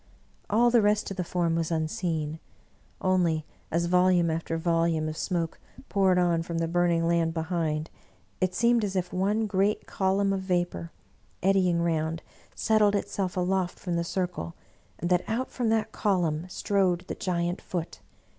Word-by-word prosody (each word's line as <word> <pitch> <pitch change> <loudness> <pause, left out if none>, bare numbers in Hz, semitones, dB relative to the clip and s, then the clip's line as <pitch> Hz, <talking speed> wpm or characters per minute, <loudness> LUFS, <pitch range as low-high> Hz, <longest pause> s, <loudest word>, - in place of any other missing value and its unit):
All 235 +3 +4
the 235 -1 +5
rest 210 0 +1
of 195 - -5
the 180 - 0
form 170 -1 0
was 165 -1 0
unseen; 160 -1 -2 0.6
only, 175 -4 +2 0.2
as 170 +2 0
volume 180 -1 +3
after 165 0 -2
volume 165 -1 +1
of 155 - -4
smoke 165 -1 -2 0.3
poured 190 -3 +3
on 175 -2 +2
from 165 0 -4
the 165 0 0
burning 170 -1 +2
land 170 -1 +1
be 165 - 0
hind, 160 -2 -2 0.5
it 185 -1 0
seemed 235 -1 +3
as 195 -2 -2
if 180 -1 -2
one 205 +4 +1
great 200 +1 +1
column 195 +1 +1
of 195 - -1
vapor, 175 - -1 0.5
eddying 185 -3 +3
round, 160 -1 -1 0.3
settled 215 -2 +3
itself 190 -2 -2
aloft 180 0 0
from 175 -3 -3
the 170 - 0
circle, 175 -1 -3 0.4
and 175 - -3
that 180 -1 +3
out 240 +4 -1
from 240 -3 -1
that 220 -1 +1
column 175 -5 0
strode 185 -2 +1
the - - -3
giant 175 -1 -2
Foot. 170 -3 -5
180 Hz, 165 wpm, -27 LUFS, 165-195 Hz, 0.6 s, the